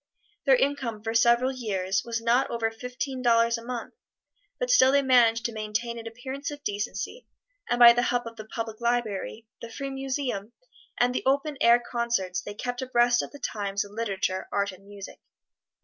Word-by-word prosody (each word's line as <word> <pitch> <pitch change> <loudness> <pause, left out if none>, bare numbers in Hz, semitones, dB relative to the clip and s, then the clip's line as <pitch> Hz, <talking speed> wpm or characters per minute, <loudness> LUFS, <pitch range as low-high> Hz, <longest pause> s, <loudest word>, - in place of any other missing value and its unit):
Their 270 - +7
income 255 -6 -1
for 225 0 -2
several 235 +3 +4
years 195 -6 -1
was 230 -1 -3
not 240 +3 +2
over 230 -1 -1
fifteen 250 +3 -5
dollars 230 -1 +3
a 230 - -7
month, 240 -1 -6 0.7
but - - 0
still 265 - +6
they 280 0 +3
managed 235 -3 +4
to 235 - 0
maintain 220 +2 -3
an 230 - -8
appearance 260 +5 -6
of 290 -1 -9
decency, 205 - -4 0.4
and 240 - +1
by 240 -1 +10
the 240 - +1
help 245 -1 0
of 230 0 -8
the 215 -1 -9
public 225 0 -6
library, 230 -2 -2 0.2
the 235 - -7
free 275 +4 -5
museum 265 -5 -3 0.5
and 245 +1 +3
the - - -1
open 280 +2 +1
air 235 +1 +6
concerts, 235 -7 -2
they 205 - -8
kept 245 +3 -4
abreast 240 -1 +3
of - - -6
the 285 - -12
times 200 -6 -2
in 200 - -14
literature, 195 -4 -2
art 200 0 0
and 190 +1 -16
music. 200 -1 -10
235 Hz, 185 wpm, -27 LUFS, 215-255 Hz, 0.7 s, by